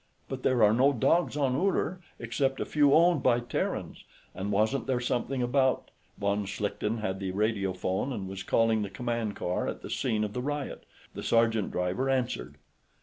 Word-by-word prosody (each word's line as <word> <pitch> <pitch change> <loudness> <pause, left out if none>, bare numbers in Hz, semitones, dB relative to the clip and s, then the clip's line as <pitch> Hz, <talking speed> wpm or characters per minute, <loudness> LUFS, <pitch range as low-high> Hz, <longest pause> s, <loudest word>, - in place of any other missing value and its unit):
"But 135 -1 -5
there 125 -3 +3
are 105 0 +6
no 135 +5 +4
dogs 165 +6 +2
on 135 -3 +1
Uller, 185 +2 0 0.2
except 135 +3 -1
a - - -1
few 145 -2 +3
owned 170 -1 +5
by 120 -2 +3
Terrans. 120 - -3 0.3
And 100 +2 -4
wasn't 110 +8 +1
there 130 -2 +1
something 125 +1 -1
about 130 +1 +1
...?" - - -37
Von 100 0 0
Schlichten 105 +2 -2
had 95 -3 -2
the 95 -1 -3
radio 100 -1 0
phone 95 +7 -2
and 100 -7 -4
was 95 0 -6
calling 115 +2 +2
the 100 - -3
command 115 0 -3
car 90 - -2
at - - -5
the - - -7
scene 110 -5 0
of 105 -1 -3
the 125 - -2
riot. 145 +1 -4 0.3
The - - -6
sergeant 115 -3 +2
driver 90 +9 -1
answered. 130 -2 -1
120 Hz, 190 wpm, -29 LUFS, 105-135 Hz, 0.3 s, are